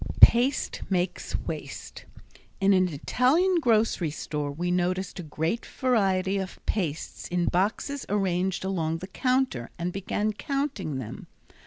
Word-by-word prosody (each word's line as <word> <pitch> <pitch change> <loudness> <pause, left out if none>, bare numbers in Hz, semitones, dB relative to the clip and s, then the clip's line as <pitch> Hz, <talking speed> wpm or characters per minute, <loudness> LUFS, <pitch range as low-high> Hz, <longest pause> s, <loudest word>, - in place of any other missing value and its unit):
Paste 250 +4 +5
Makes 185 -1 -1
Waste - - -6 0.5
In 195 +1 +4
an 185 -1 +4
Italian 270 - +2
grocery 220 - +2
store 150 -1 -3
we 175 +5 -2
noticed 180 +1 0
a - - -2
great 160 +7 -2
variety 195 -6 +1
of 190 -1 -5
pastes 165 -8 -2
in 175 0 0
boxes 215 - 0
arranged 190 -2 0
along 165 -4 -1
the 180 - -7
counter 255 - 0
and 175 +1 -2
began 205 +2 -1
counting 265 - -2
them. 120 -5 -7
190 Hz, 130 wpm, -27 LUFS, 175-230 Hz, 0.5 s, Paste